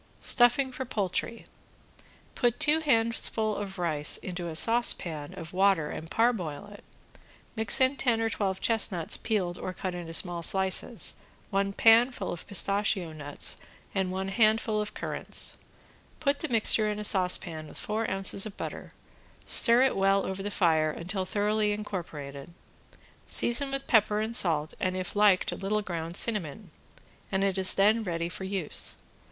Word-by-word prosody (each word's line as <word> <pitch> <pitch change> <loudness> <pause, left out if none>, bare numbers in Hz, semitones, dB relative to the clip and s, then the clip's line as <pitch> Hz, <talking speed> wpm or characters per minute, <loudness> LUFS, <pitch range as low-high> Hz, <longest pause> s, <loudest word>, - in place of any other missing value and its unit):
~STUFFING 260 +2 +3
FOR 260 - -5
POULTRY~ 225 0 -3 0.9
Put 240 -2 0
two 300 +2 +4
handfuls 225 -6 0
of 195 -1 -6
rice 155 -4 -1
into 175 -2 -6
a 165 - -6
saucepan 170 -9 -1
of 165 0 -9
water 190 -5 +2
and 160 - -7
parboil 205 -8 -1
it, 205 - -14 0.7
mix 220 -2 +3
in 260 +1 +2
ten 235 -4 +1
or 225 - 0
twelve 195 -3 -2
chestnuts 200 -7 0
peeled 185 -5 -2
or 185 - -5
cut 185 0 -5
into 175 -2 -7
small 170 +1 0
slices, 190 +3 +2 0.3
one 195 0 0
pan 230 +5 +5
full 200 -6 -5
of 175 - -8
pistachio 200 -3 0
nuts 145 -2 -1 0.4
and 190 -2 -1
one 190 +1 -3
handful 215 0 +2
of 210 - -6
currants. - - -2 0.6
Put 285 -2 0
the 315 - -3
mixture 220 -3 +3
in 210 - -3
a 210 - -5
saucepan 180 -5 0
with - - -13
four 220 +1 -2
ounces 195 +1 +1
of 210 - -11
butter, - - -7 0.5
stir 235 +2 +5
it 265 - +2
well 195 0 +2
over 190 +1 -4
the 205 - -3
fire 160 -6 +2
until 180 +5 -3
thoroughly 210 +1 0
incorporated, 170 -7 -7 0.7
season 240 +4 +1
with 275 0 -4
pepper 210 -2 +3
and 220 +2 -2
salt 155 -6 +2
and 185 0 -1
if 185 +1 -5
liked 205 -3 +3
a - - -4
little 210 +2 -2
ground 170 -2 -5
cinnamon, 205 -4 -1 0.6
and 195 0 0
it 195 -2 0
is 190 -1 +4
then 215 +3 +3
ready 170 -3 -3
for 190 +2 -7
use. 190 -5 +1
195 Hz, 160 wpm, -28 LUFS, 175-220 Hz, 0.9 s, pan